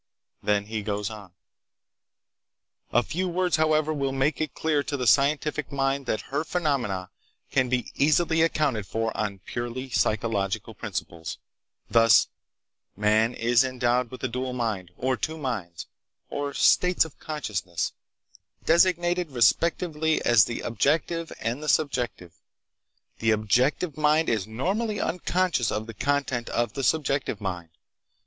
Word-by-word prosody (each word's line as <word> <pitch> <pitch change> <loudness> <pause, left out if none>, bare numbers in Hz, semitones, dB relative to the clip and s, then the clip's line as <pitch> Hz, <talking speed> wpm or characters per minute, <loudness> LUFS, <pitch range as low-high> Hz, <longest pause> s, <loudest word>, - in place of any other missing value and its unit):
Then 105 -1 +1
he 110 0 -4
goes 105 0 -3
on: 105 -4 -10 1.6
"A 120 - +3
few 185 +10 -2
words, 180 0 +1
however, 155 0 +2
will 140 -2 -1
make 135 +4 0
it 155 -3 -3
clear 155 -2 +1
to 140 +1 -3
the 125 - -2
scientific 145 +2 +2
mind 135 -1 -1
that 110 - 0
her 145 +3 0
phenomena 135 - -1 0.4
can 130 -1 +2
be 125 -1 -1
easily 160 +3 +3
accounted 145 -11 +1
for 115 0 -2
on 100 -3 -3
purely 120 +2 -5
psychological 105 -4 0
principles, 80 -1 -5 0.5
thus: 115 -4 +5 0.7
"Man 110 +3 +2
is 120 +2 +3
endowed 125 -1 0
with 130 +2 -10
a - - +2
dual 125 +1 -3
mind, 110 -7 -2
or 130 0 0
two 160 +5 -3
minds, 110 - -4 0.5
or 145 -1 -3
states 180 -2 +4
of 160 - -13
consciousness, 95 - -3 0.7
designated, 175 0 +3
respectively, 160 +5 +2
as 120 -4 +6
the 115 - -4
objective 160 +7 0
and 120 +6 -2
the 155 - -3
subjective. 120 - 0 0.9
The 115 - +1
objective 125 - +1
mind 155 +1 +3
is 110 -4 0
normally 200 - -1
unconscious 180 - 0
of 110 - -2
the 115 - -8
content 135 0 -1
of 120 0 -1
the 135 - -4
subjective 140 -5 0
mind. 90 -4 -4
130 Hz, 135 wpm, -26 LUFS, 110-155 Hz, 1.6 s, as